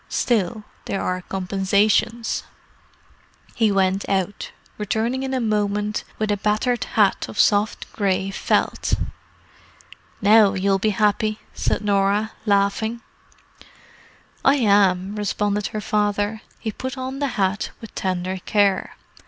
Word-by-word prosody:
Still, 215 Hz, -3 st, 0 dB, 0.2 s
there 195 Hz, -, -2 dB
are 185 Hz, 0 st, -2 dB
compensations." 200 Hz, +4 st, +1 dB, 1.1 s
He 220 Hz, -3 st, +2 dB
went 195 Hz, 0 st, +1 dB
out, 195 Hz, 0 st, -1 dB, 0.3 s
returning 225 Hz, +5 st, -1 dB
in 265 Hz, 0 st, -3 dB
a 260 Hz, -, 0 dB
moment 210 Hz, -2 st, 0 dB
with 215 Hz, -1 st, -1 dB
a 205 Hz, -, +1 dB
battered 215 Hz, +4 st, 0 dB
hat 205 Hz, -3 st, +3 dB
of -, -, -9 dB
soft 210 Hz, 0 st, +2 dB
grey 195 Hz, -1 st, 0 dB
felt. -, -, 0 dB, 1.2 s
"Now 210 Hz, -1 st, +5 dB
you'll 195 Hz, +1 st, +1 dB
be 215 Hz, -, +1 dB
happy!" 215 Hz, +1 st, +2 dB, 0.2 s
said -, -, -1 dB
Norah, 205 Hz, +1 st, +1 dB, 0.2 s
laughing. 205 Hz, +3 st, +1 dB, 1.4 s
"I 275 Hz, -, +5 dB
am," 200 Hz, -5 st, +3 dB
responded 205 Hz, 0 st, -1 dB
her 215 Hz, -, -5 dB
father. 205 Hz, +1 st, 0 dB, 0.2 s
He 220 Hz, -, -4 dB
put 260 Hz, +5 st, -6 dB
on 260 Hz, +1 st, -4 dB
the 285 Hz, -, 0 dB
hat 195 Hz, +1 st, 0 dB
with 225 Hz, -, -11 dB
tender 185 Hz, 0 st, -2 dB
care. 200 Hz, -3 st, +1 dB
205 Hz, 120 wpm, -22 LUFS, 195-220 Hz, 1.4 s, Now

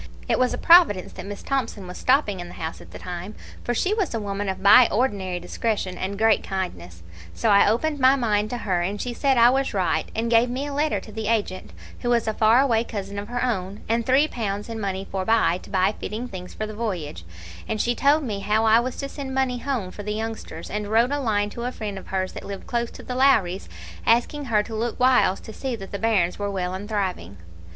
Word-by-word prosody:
It -, -, +1 dB
was 255 Hz, -1 st, +3 dB
a -, -, -2 dB
providence 335 Hz, -, +5 dB
that -, -, -8 dB
Miss 205 Hz, 0 st, -7 dB
Thomson 240 Hz, -8 st, -2 dB
was 180 Hz, 0 st, -8 dB
stopping 255 Hz, -8 st, +2 dB
in 175 Hz, -, -6 dB
the -, -, -11 dB
house 160 Hz, 0 st, -5 dB
at -, -, -14 dB
the -, -, -9 dB
time, 180 Hz, +3 st, -7 dB, 0.3 s
for 240 Hz, -, -1 dB
she 380 Hz, -, +1 dB
was 405 Hz, -, -1 dB
a -, -, -1 dB
woman 200 Hz, -1 st, -3 dB
of 190 Hz, 0 st, -4 dB
by 225 Hz, +4 st, +8 dB
ordinary 200 Hz, -6 st, 0 dB
discretion 190 Hz, +1 st, -2 dB
and 195 Hz, +2 st, -4 dB
great 220 Hz, 0 st, +3 dB
kindness; 90 Hz, -, -5 dB, 0.3 s
so 85 Hz, -, 0 dB
I 200 Hz, 0 st, +6 dB
opened 290 Hz, +7 st, 0 dB
my 260 Hz, +1 st, +6 dB
mind 215 Hz, -5 st, 0 dB
to 245 Hz, -, -3 dB
her, 185 Hz, -6 st, -1 dB
and 195 Hz, +4 st, -2 dB
she 245 Hz, +2 st, -3 dB
said 270 Hz, +1 st, +1 dB
I 235 Hz, +1 st, +7 dB
was 270 Hz, -3 st, 0 dB
right, 185 Hz, -3 st, 0 dB
and 230 Hz, +1 st, -1 dB
gave 235 Hz, +1 st, +4 dB
me 260 Hz, +3 st, -3 dB
a 290 Hz, -, -5 dB
letter 300 Hz, +2 st, +1 dB
to 215 Hz, -, -12 dB
the 220 Hz, 0 st, -4 dB
agent, 210 Hz, -4 st, -1 dB, 0.3 s
who 240 Hz, -, -2 dB
was 235 Hz, -2 st, +2 dB
a 220 Hz, -, +1 dB
far 220 Hz, +4 st, +5 dB
away 230 Hz, -5 st, +2 dB
cousin 200 Hz, -3 st, -5 dB
of 205 Hz, -, -6 dB
her 245 Hz, +1 st, -2 dB
own, 195 Hz, -4 st, -3 dB
and 230 Hz, +1 st, +1 dB
three 265 Hz, +5 st, +4 dB
pounds 210 Hz, -5 st, -4 dB
in 225 Hz, -1 st, -5 dB
money 195 Hz, -2 st, -3 dB
forbye, 195 Hz, -2 st, +1 dB
to -, -, -14 dB
buy 190 Hz, +1 st, +2 dB
fitting 225 Hz, +5 st, -4 dB
things 185 Hz, -5 st, -9 dB
for 215 Hz, -, -3 dB
the 215 Hz, -, -7 dB
voyage; 180 Hz, -, -4 dB, 0.4 s
and 215 Hz, -, -2 dB
she 240 Hz, +3 st, +1 dB
told 285 Hz, +5 st, +3 dB
me 210 Hz, -6 st, -3 dB
how 210 Hz, +3 st, +1 dB
I 220 Hz, +1 st, +6 dB
was 250 Hz, +1 st, -3 dB
to 275 Hz, -, -4 dB
send 275 Hz, -2 st, -6 dB
money 260 Hz, -2 st, 0 dB
home 240 Hz, -9 st, -3 dB
for 205 Hz, -, -8 dB
the 210 Hz, +1 st, -3 dB
youngsters, 220 Hz, -7 st, -6 dB
and 210 Hz, 0 st, -3 dB
wrote 230 Hz, +5 st, +3 dB
a 290 Hz, -, 0 dB
line 210 Hz, -5 st, 0 dB
to 235 Hz, +2 st, -5 dB
a 250 Hz, -, -1 dB
friend 205 Hz, -5 st, -5 dB
of -, -, -14 dB
hers 185 Hz, -1 st, -2 dB
that -, -, -8 dB
lived 200 Hz, -1 st, -7 dB
close 235 Hz, -1 st, -1 dB
to -, -, -12 dB
the 250 Hz, -, -5 dB
Lowries, 215 Hz, -9 st, +2 dB, 0.4 s
asking 260 Hz, +5 st, +2 dB
her 215 Hz, -4 st, +2 dB
to 225 Hz, -, -9 dB
look 230 Hz, +2 st, -2 dB
whiles 250 Hz, -7 st, +4 dB
to 220 Hz, -, -10 dB
see 260 Hz, 0 st, -3 dB
that 195 Hz, -3 st, -9 dB
the 200 Hz, -, -4 dB
bairns 200 Hz, -6 st, +1 dB
were 205 Hz, 0 st, -1 dB
well 185 Hz, -2 st, -2 dB
and 200 Hz, +3 st, -6 dB
thriving. 185 Hz, -, -3 dB
215 Hz, 245 wpm, -24 LUFS, 195-245 Hz, 0.4 s, by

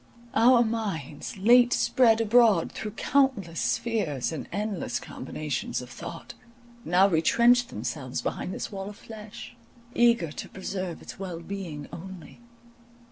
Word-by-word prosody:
Our 245 Hz, -1 st, +6 dB
minds, 205 Hz, -, -4 dB
late 240 Hz, +5 st, +6 dB
spread 230 Hz, -3 st, +3 dB
abroad 225 Hz, -5 st, +4 dB
through 210 Hz, -2 st, -6 dB
countless 255 Hz, -, +1 dB
spheres 160 Hz, -, -1 dB
and 160 Hz, -, -6 dB
endless 210 Hz, 0 st, -2 dB
combinations -, -, -4 dB
of -, -, -9 dB
thought, -, -, -8 dB, 0.5 s
now 185 Hz, +1 st, +4 dB
retrenched 235 Hz, +8 st, +4 dB
themselves 125 Hz, +4 st, -4 dB
behind -, -, -3 dB
this -, -, -5 dB
wall 195 Hz, 0 st, -5 dB
of 205 Hz, -, -11 dB
flesh, 215 Hz, 0 st, -10 dB, 0.4 s
eager 235 Hz, -9 st, +3 dB
to -, -, -7 dB
preserve 185 Hz, -2 st, -5 dB
its -, -, -10 dB
well 180 Hz, -4 st, -5 dB
being 170 Hz, -6 st, -6 dB
only. 190 Hz, +4 st, -10 dB
200 Hz, 130 wpm, -27 LUFS, 170-235 Hz, 0.5 s, Our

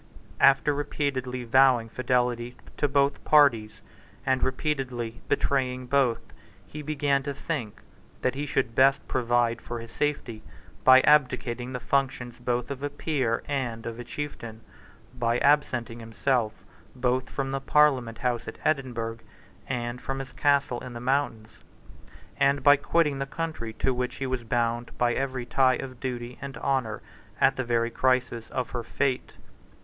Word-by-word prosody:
After 135 Hz, +2 st, +5 dB
repeatedly 135 Hz, -3 st, -2 dB
vowing 125 Hz, -1 st, +4 dB
fidelity 125 Hz, 0 st, -1 dB, 0.2 s
to 145 Hz, -, +2 dB
both 140 Hz, 0 st, +1 dB
parties, 120 Hz, -8 st, +4 dB, 0.4 s
and 130 Hz, -1 st, +2 dB
repeatedly 130 Hz, -4 st, -2 dB
betraying 130 Hz, -2 st, 0 dB
both, 125 Hz, -2 st, 0 dB, 0.3 s
he 150 Hz, -, -8 dB
began 145 Hz, -2 st, 0 dB
to 140 Hz, 0 st, -4 dB
think 125 Hz, -11 st, -4 dB, 0.4 s
that 130 Hz, -, +2 dB
he 145 Hz, +2 st, -4 dB
should 125 Hz, -4 st, 0 dB
best 135 Hz, +2 st, +4 dB
provide 120 Hz, -2 st, +1 dB
for 120 Hz, -, -6 dB
his 115 Hz, 0 st, -9 dB
safety 140 Hz, -7 st, -2 dB, 0.4 s
by 130 Hz, 0 st, +8 dB
abdicating 130 Hz, -3 st, +2 dB
the 125 Hz, -, -3 dB
functions 125 Hz, -2 st, -1 dB
both 120 Hz, +1 st, -2 dB
of 135 Hz, -1 st, -5 dB
a 145 Hz, -, -2 dB
peer 140 Hz, -5 st, -1 dB
and 125 Hz, -5 st, -3 dB
of 115 Hz, 0 st, -5 dB
a -, -, -5 dB
chieftain, 120 Hz, -4 st, -7 dB, 0.5 s
by 120 Hz, -1 st, 0 dB
absenting 130 Hz, -5 st, +2 dB
himself 115 Hz, 0 st, 0 dB, 0.4 s
both 130 Hz, +1 st, 0 dB
from 135 Hz, -1 st, -3 dB
the 135 Hz, 0 st, -2 dB
Parliament 135 Hz, -6 st, +3 dB
House 120 Hz, -2 st, -2 dB
at -, -, -7 dB
Edinburgh 120 Hz, -6 st, -1 dB, 0.5 s
and 120 Hz, -1 st, -3 dB
from 135 Hz, -, -4 dB
his 135 Hz, 0 st, -7 dB
castle 140 Hz, -4 st, +2 dB
in 125 Hz, -, -8 dB
the 120 Hz, -, -6 dB
mountains, 125 Hz, -4 st, -1 dB, 0.9 s
and 140 Hz, +1 st, +2 dB
by 145 Hz, 0 st, +8 dB
quitting 150 Hz, 0 st, +1 dB
the 135 Hz, -, -2 dB
country 155 Hz, -7 st, -4 dB
to 130 Hz, -, 0 dB
which 125 Hz, 0 st, -3 dB
he 135 Hz, -, -4 dB
was 130 Hz, -2 st, -2 dB
bound 120 Hz, 0 st, -1 dB
by 120 Hz, -1 st, +2 dB
every 130 Hz, -1 st, -2 dB
tie 130 Hz, +1 st, +3 dB
of 130 Hz, -1 st, -7 dB
duty 125 Hz, -1 st, -5 dB
and 140 Hz, 0 st, -6 dB
honour 130 Hz, -6 st, -1 dB, 0.4 s
at 135 Hz, -, +4 dB
the 130 Hz, -, -2 dB
very 120 Hz, -1 st, 0 dB
crisis 125 Hz, -3 st, 0 dB
of 125 Hz, -2 st, -3 dB
her 120 Hz, -, -3 dB
fate. 130 Hz, +2 st, -2 dB
130 Hz, 155 wpm, -27 LUFS, 120-140 Hz, 0.9 s, by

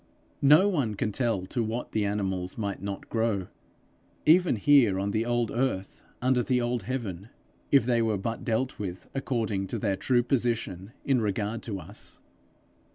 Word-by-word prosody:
No 150 Hz, +8 st, +7 dB
one 140 Hz, -, 0 dB
can 105 Hz, +2 st, -1 dB
tell 115 Hz, -5 st, 0 dB
to 115 Hz, +5 st, -1 dB
what 115 Hz, +3 st, -3 dB
the 110 Hz, -1 st, 0 dB
animals 95 Hz, -3 st, -2 dB
might 100 Hz, -3 st, -3 dB
not 100 Hz, 0 st, -5 dB
grow, 110 Hz, -5 st, -1 dB, 0.8 s
even 170 Hz, -1 st, +5 dB
here 115 Hz, -4 st, +4 dB
on 100 Hz, +1 st, -1 dB
the 110 Hz, +3 st, 0 dB
old 120 Hz, -2 st, +1 dB
earth 120 Hz, -6 st, -2 dB, 0.2 s
under 130 Hz, -1 st, +3 dB
the 125 Hz, 0 st, +1 dB
old 120 Hz, 0 st, -1 dB
heaven, 105 Hz, -4 st, -4 dB, 0.4 s
if 140 Hz, -5 st, +5 dB
they 120 Hz, -1 st, +2 dB
were 110 Hz, -2 st, +1 dB
but 115 Hz, +4 st, -4 dB
dealt 125 Hz, +3 st, -1 dB
with 90 Hz, -3 st, -5 dB
according 110 Hz, -8 st, -1 dB
to -, -, -3 dB
their 100 Hz, -3 st, 0 dB
true 120 Hz, +4 st, +2 dB
position 115 Hz, -6 st, -1 dB
in 135 Hz, -3 st, +3 dB
regard 105 Hz, +2 st, -1 dB
to 100 Hz, -4 st, -4 dB
us. 95 Hz, +5 st, -8 dB
115 Hz, 165 wpm, -28 LUFS, 100-125 Hz, 0.8 s, No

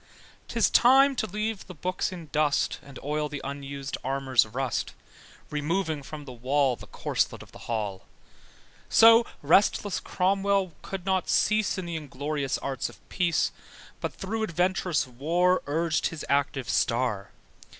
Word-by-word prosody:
'Tis -, -, +2 dB
time 270 Hz, +3 st, +6 dB
to 220 Hz, -, -1 dB
leave 210 Hz, +1 st, -3 dB
the 185 Hz, -, -9 dB
books 180 Hz, +4 st, -2 dB
in 175 Hz, -3 st, -8 dB
dust, 150 Hz, -1 st, +1 dB
And 140 Hz, -2 st, -12 dB
oil 150 Hz, +1 st, -1 dB
the 145 Hz, 0 st, -5 dB
unusèd 140 Hz, 0 st, -5 dB
armour's 130 Hz, -3 st, +2 dB
rust: 125 Hz, +2 st, -3 dB, 0.6 s
Removing 155 Hz, +1 st, -1 dB
from 150 Hz, +1 st, -9 dB
the 130 Hz, -, -8 dB
wall 130 Hz, +2 st, +1 dB
The -, -, -13 dB
corslet -, -, -2 dB
of -, -, -18 dB
the -, -, -12 dB
hall. 105 Hz, -4 st, -3 dB, 0.8 s
So 230 Hz, +1 st, +7 dB, 0.2 s
restless 195 Hz, +5 st, +3 dB
Cromwell 195 Hz, -1 st, +1 dB
could 190 Hz, -2 st, -6 dB
not 190 Hz, -1 st, 0 dB
cease 215 Hz, -1 st, +2 dB
In 185 Hz, -, -4 dB
the 170 Hz, -1 st, -3 dB
inglorious 145 Hz, -1 st, -3 dB
arts 135 Hz, -3 st, -3 dB
of -, -, -18 dB
peace, 170 Hz, -4 st, +1 dB, 0.5 s
But -, -, -4 dB
through 220 Hz, +4 st, -3 dB
adventurous 180 Hz, -4 st, +1 dB
war 170 Hz, +9 st, +1 dB
Urgèd 160 Hz, +2 st, +1 dB
his 165 Hz, -3 st, -6 dB
active 140 Hz, -2 st, 0 dB
star. 115 Hz, -6 st, 0 dB
155 Hz, 145 wpm, -27 LUFS, 135-185 Hz, 0.8 s, So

